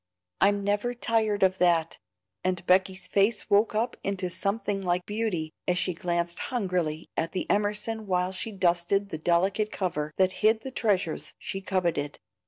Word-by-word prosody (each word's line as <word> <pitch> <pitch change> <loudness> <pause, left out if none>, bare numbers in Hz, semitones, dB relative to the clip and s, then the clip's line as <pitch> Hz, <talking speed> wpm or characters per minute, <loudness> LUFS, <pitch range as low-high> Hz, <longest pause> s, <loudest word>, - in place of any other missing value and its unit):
I'm 200 +1 +3
never 205 +5 0
tired 220 -4 +1
of 190 0 +3
that;" 170 -2 +2 0.4
and 185 -1 -1
Becky's 185 +1 +2
face 205 +2 +1
woke 210 +2 +4
up 230 +3 0
into 190 -2 -2
something 200 +1 -1
like 180 -1 0
beauty 205 -8 -2
as 180 - +2
she 180 - 0
glanced 170 0 -1
hungrily 180 - -1
at 165 +1 -2
the 185 - -2
Emerson 210 +1 0
while 180 -1 +1
she 190 +4 -3
dusted 185 +1 +1
the 160 - -5
delicate 190 +6 +1
cover 155 -5 -2
that 185 -1 +3
hid 220 +1 +4
the 265 - -7
treasures 195 -9 -1
she 195 0 -5
coveted. 170 -7 -1
190 Hz, 160 wpm, -27 LUFS, 175-210 Hz, 0.4 s, woke